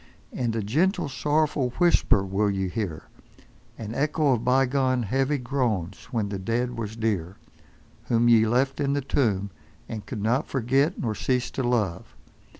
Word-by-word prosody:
And 120 -3 -1
a 110 - -1
gentle, 160 - +1
sorrowful, 145 0 0
whisper 170 - +3
will 100 +2 0
ye 95 -1 -1
hear, 95 -6 -4 0.7
an 110 -1 -6
echo 150 +1 +1
of 115 -2 -1
bygone 130 0 +2
heavy 135 +6 0
groans 120 -9 -2
when 115 -4 -2
the 100 -1 -4
dead 120 +5 -1
was 110 -2 -5
dear, 100 -6 -2 0.7
whom 120 0 +2
ye 115 -2 +5
left 135 +5 +1
in 140 -1 +1
the 145 - 0
tomb, 105 -8 0 0.4
and 110 -2 -6
could 110 -6 -5
not 120 +6 +1
forget 135 +6 +1
nor 110 -3 -1
cease 125 +2 -1
to - - -3
love. 115 -8 -1
120 Hz, 155 wpm, -25 LUFS, 105-135 Hz, 0.7 s, ye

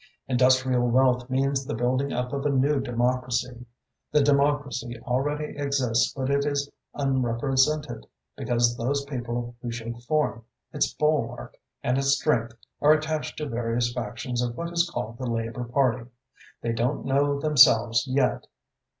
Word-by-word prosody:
Industrial 130 -1 +3
wealth 125 0 +2
means 135 +1 0
the 130 - -4
building 130 +4 0
up 125 +1 -3
of 140 -1 -2
a 145 - +1
new 140 +1 +2
democracy. 125 -1 -1 0.4
The 150 - +4
democracy 140 -4 +1
already 145 +4 -2
exists 140 -5 +1
but 135 0 -3
it 140 0 +2
is 145 -1 -1 0.3
unrepresented, 135 - 0 0.3
because 120 -1 +1
those 140 +4 -1
people 120 -3 -4
who 120 - -4
should 115 0 -6
form 120 -6 0 0.3
its - - +1
bulwark 150 -6 -1 0.3
and 125 +2 +1
its 140 0 +3
strength 120 -6 0 0.3
are 150 +1 +6
attached 155 0 -2
to 150 - -3
various 120 -1 -1
factions 120 +1 -3
of 120 -1 -3
what 170 0 -4
is 170 0 +2
called 120 -4 -5
the 130 -2 -3
Labour 115 +1 -3
Party. 120 -1 0 0.5
They 115 - 0
don't 120 +5 -1
know 140 +1 +1
themselves 125 -5 +5
yet. 130 0 0
130 Hz, 145 wpm, -26 LUFS, 120-140 Hz, 0.5 s, are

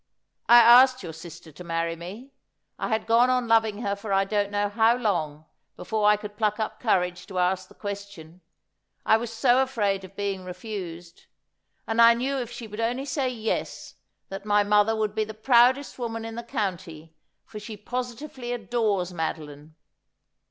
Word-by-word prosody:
' - - -55
I 240 - +9
asked 250 +1 +7
your 165 -2 -7
sister 165 0 -11
to 165 +5 -11
marry 165 0 -2
me. 200 +11 -10 0.5
I - - -2
had 220 -1 -1
gone 235 +2 +4
on 250 -1 +1
loving 225 -1 +2
her 200 0 -1
for 200 +1 -7
I 195 0 +3
don't 205 0 -1
know 205 0 0
how 225 +3 +3
long, 160 -10 -2 0.3
before 215 -2 0
I 210 - +4
could 210 0 -9
pluck 210 -1 0
up 220 - -3
courage 180 -6 0
to 190 - -7
ask 185 +1 0
the - - -19
question, 200 -5 -8 0.6
I 220 - +5
was 230 0 -5
so 245 +3 +3
afraid 205 -7 -1
of 190 +1 -13
being 200 -2 -3
refused. 180 -3 -8 0.6
And 225 +1 +1
I 230 0 +8
knew 265 +3 -2
if 240 -3 -4
she 240 -1 -8
would 210 0 -9
only 245 +4 -1
say 275 -2 -1
"Yes," 225 -3 -4 0.4
that 195 0 -7
my 205 0 +3
mother 210 +2 +3
would 215 -1 -1
be 215 0 0
the 215 0 -8
proudest 250 +5 +3
woman 225 -2 -4
in 225 - -6
the 235 - -5
county, 185 - -5 0.3
for 215 - -9
she 210 0 -9
positively 245 +3 -5
adores 210 -5 -1
Madeline. 155 -2 -6
210 Hz, 180 wpm, -25 LUFS, 185-235 Hz, 0.6 s, I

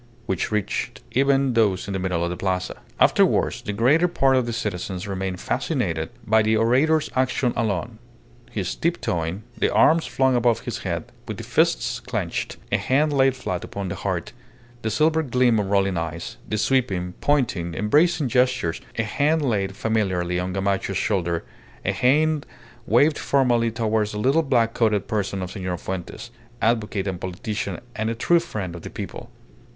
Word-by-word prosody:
which 95 - -2
reached 105 -2 -2
even 135 0 +3
those 105 -5 +2
in 100 - -4
the 95 - -1
middle 90 -2 -1
of 85 - -1
the - - -3
Plaza. 90 0 -2 0.2
Afterwards - - +3
the - - -4
greater 135 - +3
part 135 -6 +2
of 130 -2 +1
the - - -1
citizens 95 -4 -3
remained 95 -2 -3
fascinated - - -1 0.2
by 110 +1 +4
the 110 +1 +2
orator's 135 +8 +3
action 130 -1 +1
alone, 110 0 -2 0.5
his 95 -4 -3
tip 170 +1 -1
toeing, 85 +4 -2 0.2
the - - +2
arms 165 +1 +4
flung 130 -1 +2
above 120 -1 +2
his - - -4
head - - -4 0.2
with - - -5
the - - -6
fists - - +1
clenched, - - -3
a - - +3
hand 145 +3 +1
laid 135 -1 +3
flat 90 -9 -4
upon 100 -2 -5
the 95 - -3
heart, 95 -3 -3 0.5
the 110 - -1
silver 155 +8 +2
gleam 125 -5 +2
of 100 -2 -2
rolling 100 -2 +2
eyes, 80 -1 -5
the 110 - 0
sweeping, 105 -6 0
pointing, 110 - +1
embracing 150 - +3
gestures, 125 -8 +1 0.2
a 115 - +2
hand 150 +8 +1
laid 100 -4 0
familiarly 95 -6 0
on 90 +1 -2
Gamacho's 95 0 -1
shoulder; 85 -5 0 0.4
a 100 - +2
hand 145 +8 +2 0.4
waved 145 +7 +4
formally 120 -4 +2
towards 110 -2 0
the - - -4
little 135 +9 +3
black 120 -6 +2
coated 105 -4 +1
person 100 -3 -2
of 90 - -6
Senor 95 -3 -3
Fuentes, 95 +6 -6 0.3
advocate 110 -4 0
and 95 -3 -4
politician 95 +1 -4 0.2
and 110 +1 -1
a 115 - -2
true 170 +9 +3
friend 105 - -5
of 85 - -8
the - - -7
people. - - -7
110 Hz, 170 wpm, -23 LUFS, 95-130 Hz, 0.5 s, by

